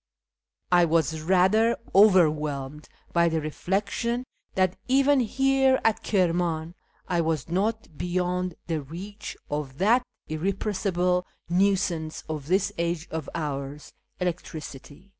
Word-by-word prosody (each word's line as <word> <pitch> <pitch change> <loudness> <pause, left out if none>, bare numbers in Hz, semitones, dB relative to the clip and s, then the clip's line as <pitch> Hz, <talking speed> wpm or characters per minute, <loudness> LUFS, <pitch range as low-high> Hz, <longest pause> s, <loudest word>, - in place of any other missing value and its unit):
I 175 -1 +6
was 165 -2 +2
ratlier 190 +7 +4 0.2
overwhelmed 150 -7 +3 0.2
by 170 0 +4
the 165 0 0
reflection 200 +9 -2 0.3
that 185 -1 +2
even 275 +2 +4
here 265 +2 +3
at 225 -1 +2
Kirman 170 -4 0 0.3
I 175 -2 +1
was 160 -3 -1
not 205 0 -1
beyond 180 0 -1
the 160 -3 -2
reach 190 +9 -8
of 145 -3 -3
that 225 +8 +4 0.3
irrepressible 180 +1 0 0.2
nuisance 180 -3 +1
of 155 -3 -5
this 190 +3 +1
age 170 -1 -1
of 160 -3 -4
ours, 145 -2 -4 0.3
electricity. 165 -2 -6
180 Hz, 110 wpm, -26 LUFS, 155-200 Hz, 0.3 s, I